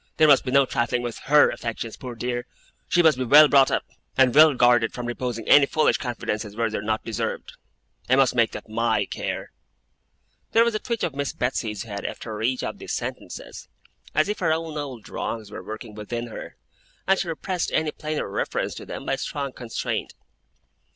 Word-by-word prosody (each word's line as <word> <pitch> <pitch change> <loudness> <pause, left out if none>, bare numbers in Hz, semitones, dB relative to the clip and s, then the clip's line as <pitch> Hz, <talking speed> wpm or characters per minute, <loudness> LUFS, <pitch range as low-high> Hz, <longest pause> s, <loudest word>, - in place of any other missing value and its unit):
There 155 - +6
must 140 -3 +6
be 130 - -4
no 140 +1 +5
trifling 120 0 -1
with 120 -2 -5
HER 145 +2 +6
affections, 115 -1 -5
poor 125 -2 -8
dear. 120 +1 -3 0.4
She 175 - +3
must 155 -5 +4
be - - +1
well 150 +5 +8
brought 135 -2 +5
up, - - -1 0.3
and 130 -2 +5
well 155 -1 +7
guarded 120 -2 +4
from 125 - -5
reposing 120 -2 -4
any 145 -1 +7
foolish 155 - +2
confidences 110 -4 -4
where 115 -1 0
they 110 - -2
are - - -5
not 110 +1 -2
deserved. 115 0 -4 0.6
I 130 - +5
must 135 -1 +4
make 115 -2 +3
that - - -8
MY 115 +1 +1
care.' - - -5 1.0
There 230 - +6
was 235 -1 +1
a 215 - -1
twitch 235 -1 -3
of 160 - -1
Miss 140 0 -3
Betsey's 115 -4 -2
head, 100 -3 -6
after 110 -2 -5
each 125 +3 0
of - - -4
these - - -5
sentences, - - -6 0.5
as 155 - +3
if 210 - -2
her 165 -4 +1
own 160 -1 -2
old 135 -8 -6
wrongs 110 -3 -5
were - - -7
working 110 0 -8
within 115 +3 -5
her, - - -8 0.5
and 195 0 +3
she 180 - -2
repressed 175 +2 -2
any 155 -1 +1
plainer 155 0 -4
reference 100 - -2
to - - -9
them - - -7
by - - 0
strong 140 -2 -4
constraint. 120 -3 -4
125 Hz, 200 wpm, -24 LUFS, 115-150 Hz, 1.0 s, well